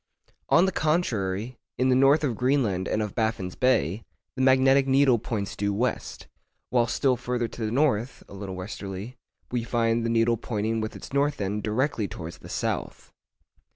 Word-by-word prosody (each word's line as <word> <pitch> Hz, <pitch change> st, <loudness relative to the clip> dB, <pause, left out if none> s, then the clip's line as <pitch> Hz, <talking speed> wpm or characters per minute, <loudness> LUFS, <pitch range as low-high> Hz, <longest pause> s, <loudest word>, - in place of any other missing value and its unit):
On 170 Hz, -, +6 dB
the 190 Hz, -, +1 dB
contrary, 120 Hz, -, -1 dB, 0.2 s
in 130 Hz, +1 st, +2 dB
the 130 Hz, -, +4 dB
north 135 Hz, +4 st, +5 dB
of 130 Hz, -6 st, 0 dB
Greenland 120 Hz, -7 st, +1 dB
and 110 Hz, -, 0 dB
of 105 Hz, -, -5 dB
Baffin's 110 Hz, -6 st, -1 dB
Bay, 115 Hz, -, +1 dB, 0.3 s
the 130 Hz, -, -2 dB
magnetic 135 Hz, +1 st, +5 dB
needle 135 Hz, -3 st, +4 dB
points 105 Hz, -3 st, -4 dB
due 100 Hz, 0 st, -1 dB
west; 125 Hz, +4 st, -2 dB, 0.4 s
while 120 Hz, -2 st, +3 dB
still 130 Hz, +2 st, +2 dB
further 125 Hz, 0 st, -2 dB
to 115 Hz, -, -7 dB
the -, -, -3 dB
north 130 Hz, -3 st, 0 dB
(a -, -, -13 dB
little 95 Hz, -1 st, -6 dB
westerly), 100 Hz, +4 st, -6 dB, 0.4 s
we 120 Hz, -2 st, -1 dB
find 115 Hz, 0 st, +1 dB
the 115 Hz, -, 0 dB
needle 115 Hz, 0 st, +2 dB
pointing 110 Hz, 0 st, -2 dB
with 110 Hz, -, -4 dB
its -, -, -10 dB
north 145 Hz, +1 st, +1 dB
end 100 Hz, +1 st, -2 dB
directly 110 Hz, 0 st, 0 dB
towards 85 Hz, -2 st, -8 dB
the -, -, -12 dB
south. -, -, -4 dB
115 Hz, 175 wpm, -26 LUFS, 105-130 Hz, 0.4 s, On